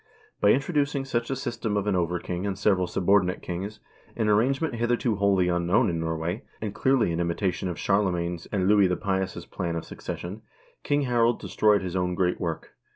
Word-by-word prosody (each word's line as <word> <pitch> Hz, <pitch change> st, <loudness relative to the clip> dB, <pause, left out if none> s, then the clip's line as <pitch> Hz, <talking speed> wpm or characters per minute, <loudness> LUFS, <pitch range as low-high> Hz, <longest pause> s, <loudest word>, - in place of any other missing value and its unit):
By 100 Hz, -, +4 dB
introducing 140 Hz, +1 st, +1 dB
such 120 Hz, -3 st, -2 dB
a 135 Hz, -, 0 dB
system 115 Hz, -5 st, -2 dB
of 100 Hz, -, -1 dB
an 105 Hz, -2 st, +1 dB
over 90 Hz, 0 st, 0 dB
king 90 Hz, +2 st, -4 dB
and 95 Hz, -2 st, -2 dB
several 95 Hz, -3 st, +2 dB
subordinate 95 Hz, 0 st, +2 dB
kings, 95 Hz, +4 st, -5 dB, 0.4 s
an 110 Hz, -2 st, 0 dB
arrangement 135 Hz, +9 st, +2 dB
hitherto 120 Hz, -1 st, 0 dB
wholly 100 Hz, -2 st, +3 dB
unknown 90 Hz, +4 st, +2 dB
in 85 Hz, -, -2 dB
Norway, 80 Hz, +4 st, -2 dB, 0.2 s
and 105 Hz, -2 st, -4 dB
clearly 130 Hz, -9 st, +2 dB
an 85 Hz, -, -2 dB
imitation 90 Hz, +2 st, -1 dB
of 85 Hz, -, -4 dB
Charle 100 Hz, -1 st, +2 dB
magne's 85 Hz, 0 st, -3 dB
and 95 Hz, -3 st, 0 dB
Louis 100 Hz, -2 st, +5 dB
the 90 Hz, -1 st, 0 dB
Pious' 95 Hz, -2 st, -2 dB
plan 85 Hz, -2 st, -3 dB
of 80 Hz, -, -4 dB
succession, 95 Hz, +5 st, -6 dB, 0.4 s
King 145 Hz, 0 st, +1 dB
Harald 120 Hz, -2 st, +2 dB
destroyed 105 Hz, -3 st, +2 dB
his 90 Hz, -1 st, -4 dB
own 90 Hz, -1 st, 0 dB
great 90 Hz, -1 st, 0 dB
work. 85 Hz, -3 st, -4 dB
100 Hz, 190 wpm, -26 LUFS, 90-115 Hz, 0.4 s, Louis